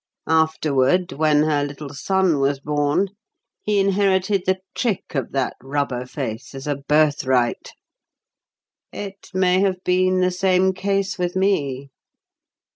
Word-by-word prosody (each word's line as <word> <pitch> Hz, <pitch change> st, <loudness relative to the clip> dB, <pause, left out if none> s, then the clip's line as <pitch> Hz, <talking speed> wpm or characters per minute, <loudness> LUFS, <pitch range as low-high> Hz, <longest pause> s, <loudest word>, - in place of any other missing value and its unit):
Afterward, 160 Hz, +1 st, +2 dB
when 150 Hz, 0 st, +2 dB
her 150 Hz, -2 st, +1 dB
little 145 Hz, 0 st, -7 dB
son 185 Hz, +1 st, +1 dB
was 135 Hz, 0 st, +1 dB
born, 145 Hz, +6 st, 0 dB, 0.5 s
he 210 Hz, -1 st, +1 dB
inherited 195 Hz, -1 st, +1 dB
the 190 Hz, 0 st, +2 dB, 0.2 s
trick 225 Hz, -7 st, -2 dB
of 135 Hz, -5 st, -2 dB
that 135 Hz, -2 st, -1 dB
rubber 135 Hz, -2 st, -2 dB
face 125 Hz, -1 st, -6 dB
as 135 Hz, -, -7 dB
a 145 Hz, -2 st, -1 dB
birthright. 140 Hz, -4 st, +1 dB, 1.2 s
It 200 Hz, -1 st, -8 dB
may 185 Hz, 0 st, +2 dB
have 190 Hz, -2 st, 0 dB
been 185 Hz, 0 st, +2 dB
the 180 Hz, 0 st, +2 dB
same 185 Hz, +1 st, +2 dB
case 195 Hz, +1 st, -1 dB
with 180 Hz, 0 st, -1 dB
me. 140 Hz, -9 st, 0 dB
160 Hz, 125 wpm, -21 LUFS, 140-190 Hz, 1.2 s, Afterward